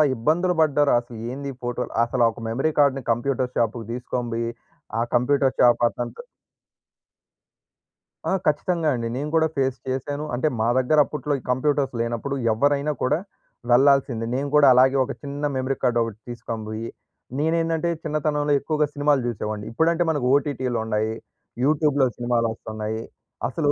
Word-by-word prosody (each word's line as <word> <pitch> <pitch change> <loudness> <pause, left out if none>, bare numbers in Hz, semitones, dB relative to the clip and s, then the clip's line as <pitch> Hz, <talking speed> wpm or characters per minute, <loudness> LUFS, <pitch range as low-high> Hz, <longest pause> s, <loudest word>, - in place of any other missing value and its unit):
ఇబ్బందులు 165 +10 +1
పడ్డారో, 145 -1 +3
అసలు 120 -1 -11
ఏందీ 140 +1 -5
ఫోటోలు 120 0 -3
అసల 120 +1 -1
ఒక 115 - -12
మెమరీ 135 +7 0
కార్డ్‌ని 135 -2 +3
కంప్యూటర్ 125 +1 -1
షాపుకు 115 -1 0
దీసుకొని 125 0 -3
బొయ్యి, 115 0 -2 0.5
ఆ - - +2
కంప్యూటర్ 135 +2 +2
షాపతనుతో 120 - +2 2.1
ఆ! - - +1 0.2
ఖచ్చితంగా 160 +2 +1
అండి. 115 -1 -3
నేను 150 +2 -3
కూడా 160 0 +4
ఫేస్ 135 -1 +1
చేశాను. 145 +3 -3
అంటే, 140 +5 +1
మా 115 - +2
దగ్గర 140 +4 +2
అప్పుట్లో 150 -1 -3
ఈ - - -15
కంప్యూటర్స్ 135 +1 +1
లేనప్పుడు, 120 +4 -2 0.2
ఎవ్వరైనా 145 +5 +1
కూడా 145 +5 +2 0.5
వెళ్లాల్సిందే. 130 -2 +4
నేను 140 +1 -2
కూడా, 145 -2 +7
అలాగే 130 +2 +5
ఒక - - -5
చిన్న 145 +1 -4
మెమరీ 130 +1 -1
కార్డొకటి 115 -4 +1
తీస్కనిబొయ్యి 115 -1 -5 0.5
నేనేందంటే 165 +2 +1
చిన్నతనంలో 150 -1 0
ఎక్కువగా 150 +1 0
సినిమాలు 145 -1 +2
చూసేవాడిని. 105 -2 -4
ఇప్పుడంటే 165 +7 +2
మనకు 145 -5 0
ఓటిటిలుండాయి, 115 -6 0 0.5
యూట్యూబ్‌లో 145 -1 +3
సినిమాలొస్తన్నాయి, 110 -2 -2 0.5
అసలు 145 +2 0
130 Hz, 130 wpm, -23 LUFS, 120-145 Hz, 2.1 s, కూడా